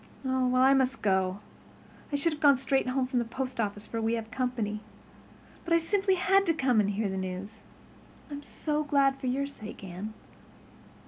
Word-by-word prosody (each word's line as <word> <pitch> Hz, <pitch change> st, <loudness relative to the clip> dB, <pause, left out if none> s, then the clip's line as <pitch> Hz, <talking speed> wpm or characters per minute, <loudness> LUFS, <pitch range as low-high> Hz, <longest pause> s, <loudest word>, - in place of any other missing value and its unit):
Well, 260 Hz, -1 st, +1 dB
I 260 Hz, +2 st, +6 dB
must 265 Hz, -1 st, +1 dB
go. 190 Hz, -1 st, +1 dB, 0.7 s
I -, -, 0 dB
should 300 Hz, +3 st, +1 dB
have 300 Hz, -, -9 dB
gone 280 Hz, -2 st, +6 dB
straight 265 Hz, 0 st, +1 dB
home 255 Hz, +1 st, +1 dB
from 250 Hz, -1 st, 0 dB
the -, -, +1 dB
post 255 Hz, +1 st, -4 dB
office 205 Hz, -1 st, -2 dB
for 230 Hz, -, -4 dB
we 225 Hz, +1 st, +1 dB
have 225 Hz, -1 st, -5 dB
company. 240 Hz, -5 st, -2 dB, 0.8 s
But 335 Hz, -1 st, +2 dB
I -, -, +7 dB
simply 385 Hz, +3 st, +1 dB
had 390 Hz, +1 st, +3 dB
to 330 Hz, -, +3 dB
come 260 Hz, -7 st, +2 dB
and 205 Hz, -1 st, +2 dB
hear 205 Hz, +1 st, -1 dB
the 190 Hz, 0 st, -3 dB
news. 190 Hz, +3 st, -5 dB, 0.7 s
I'm 285 Hz, 0 st, -5 dB
so 300 Hz, +1 st, -2 dB
glad 275 Hz, -2 st, +2 dB
for 260 Hz, -, -4 dB
your 270 Hz, +3 st, 0 dB
sake, 215 Hz, -8 st, -9 dB
Anne." 195 Hz, +4 st, -7 dB
255 Hz, 190 wpm, -29 LUFS, 215-280 Hz, 0.8 s, I